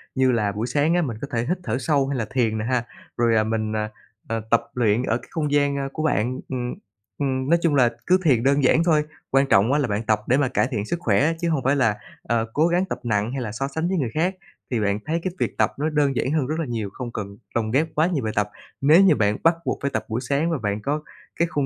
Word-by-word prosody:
như 130 -1 +3
là 105 -4 +1
buổi 105 +4 -3
sáng 150 +5 +2
mình 115 -3 -5
có 140 - -4
thể 120 - 0
là - - -3
hít 180 - +1
thở 145 - -1
sâu 140 -1 +1
hay 140 -1 -2
là 115 - -1
thiền 120 -4 0
nè 110 - -2
ha, 125 -1 +1 0.3
rồi, 115 -1 +3
ờ, 110 - +4
mình, 110 0 -1 0.6
ờ, 115 0 -2
tập 115 - +5
luyện 115 -1 +2
ở 115 -2 +1
cái 120 - -15
không 150 -3 -2
gian 140 -1 +1
của 155 - -3
bạn. 130 -4 0
Ừm, 125 -2 -3 0.4
ừm, 130 -1 -1
nói 170 +1 +4
chung 165 -4 +2
là 125 -3 +5 0.2
cứ 185 - +5
thiền 130 -8 +3
đơn 140 +1 +3
giản 160 +5 +4
thôi, 155 -3 +3 0.3
quan 135 +1 +4
trọng 100 +5 +4
là 145 -3 +2
bạn 105 0 -2
tập 110 -1 +1
để 130 - +3
mà 140 -2 +2
cải 130 - +1
thiện 105 -4 -2
sức 170 +8 -3
khỏe 140 +4 +2
chứ 170 - +1
hông 155 -5 0
phải 135 +2 +3
là, 115 -7 +2 0.3
ờ, 115 -1 0
cố 155 +3 +3
gắng 175 +2 +1
tập 190 - -5
nặng 105 -1 0
hay 135 0 -3
là 110 -4 -4
so 135 +6 -3
sánh 160 +4 -2
với 190 +1 0
người 135 -7 0
khác. 175 +5 0 0.4
Thì 120 - +1
bạn 100 -1 0
thấy 160 +2 0
cái 185 - -1
việc - - -2
tập - - +2
nó 155 +2 +1
đơn 145 -3 +1
giản 130 - 0
hơn 150 -4 +1
rất 155 +3 -2
là 165 - -1
nhiều, 115 -5 -3
không 125 -1 -6
cần 100 -2 -6 0.2
lồng 110 -2 0
ghép 145 +6 +2
quá 155 +2 +3
nhiều 165 -8 -1
bài 110 -1 -2
tập. 105 0 +1 0.3
Nếu 155 +6 +6
như 190 -6 +6
bạn 105 -3 +1
bắt 165 +1 +5
buộc - - -1
phải 140 - -1
tập - - -2
buổi 115 +3 -2
sáng 140 +5 0
và 165 - 0
bạn 105 -3 -2
có 150 +5 -2 0.3
cái 170 - +1
khung 145 -4 -1
130 Hz, 275 wpm, -23 LUFS, 115-150 Hz, 0.6 s, Nếu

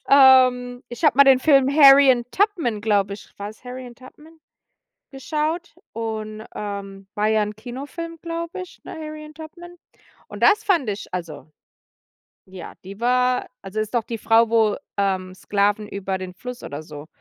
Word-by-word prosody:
Ähm, 255 -2 +5
ich 240 - -9
habe 300 - +4
mal 280 - +8
den 270 -1 +6
Film 275 -2 +4
„Harriet 275 -4 +6
Tubman“, 345 - 0
glaube 200 -2 +1
ich 200 - -14
war's 210 +4 -8
„Harriet 250 -1 -9
Tubman“ 300 +5 -16 0.7
geschaut 310 +5 -3 0.2
und, 220 -1 -5
ähm, 195 -1 -7
war 210 +1 +1
ja 220 0 +2
'n 210 0 -3
Kinofilm, 280 +9 -8
glaube 335 +1 -5
ich, 365 - -12
ne, - - -9
„Harriet 305 -1 -9
Tubman“. 345 +2 -11 0.5
Und - - -7
das 425 +1 +5
fand 340 - +2
ich 205 0 -5
also 165 -4 -6 1.0
ja, 185 -3 -10
die 195 +2 -10
war 250 +1 +1 0.2
also, 195 +2 -5
ist 215 +1 -3
doch 235 - +1
die 230 +1 -5
Frau, 225 +1 +3
wo, 220 -2 +3 0.2
ähm, 190 -2 -1
Sklaven 205 +2 0
über 195 -1 -4
den 185 -1 -7
Fluss 250 +5 -8
oder 145 +2 -7
so 150 -1 -11
240 Hz, 160 wpm, -22 LUFS, 205-285 Hz, 1.0 s, mal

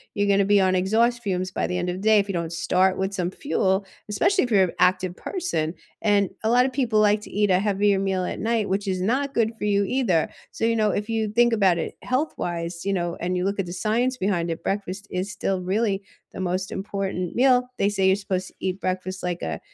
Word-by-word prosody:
you're 205 -1 +1
gonna 200 0 +4
be 205 +1 +4
on 185 0 +3
exhaust 225 +6 +2
fumes 185 -2 -2
by - - -1
the 180 - -2
end 180 0 -1
of 180 - -2
the - - -7
day 215 0 +5
if 200 - 0
you - - -1
don't 170 -2 -2
start 185 +2 +2
with 190 +1 -2
some 180 -2 -2
fuel, 190 -6 0 0.2
especially 370 - +2
if 245 - -7
you're 190 -4 +4
active 185 0 +2
person. 320 - -2 0.3
And 205 -3 +3
a 220 - +1
lot 245 +2 +5
of 265 - -1
people 245 -5 +1
like 210 0 +4
to - - -11
eat 205 -1 +1
a 180 - +4
heavier 200 0 +2
meal 190 -1 0
at - - -4
night, 225 -1 0
which 200 +2 -1
is 185 -1 -1
not 265 +8 0
good 225 -1 +2
for 210 - -4
you 200 -1 +2
either, 195 -12 +1 0.2
so, - - -6
you 230 0 +2
know, 215 -1 +2
if 205 +2 -2
you 225 -1 0
think 240 +3 +3
about 195 -6 +3
it 165 - -4
health-wise, 175 - -2
you 200 - +1
know, 175 -2 -1
and 180 +1 -1
you 180 - -1
look 200 +1 -1
at 195 - 0
the 175 - -5
science 230 +7 0
behind 185 -4 0
it, 165 - -5
breakfast 195 0 -3
is 185 +3 -2
still 190 0 -1
really 195 +2 0 0.3
the - - -8
most 185 +1 -2
important 195 -2 -3
meal. 250 -1 +4
They 200 - +2
say 195 -2 +1
you're 190 - +5
supposed 190 -2 -3
to - - -15
"Eat 185 0 -2
breakfast 185 0 -3
like 175 -1 -2
a 80 - -3
195 Hz, 245 wpm, -24 LUFS, 185-215 Hz, 0.3 s, day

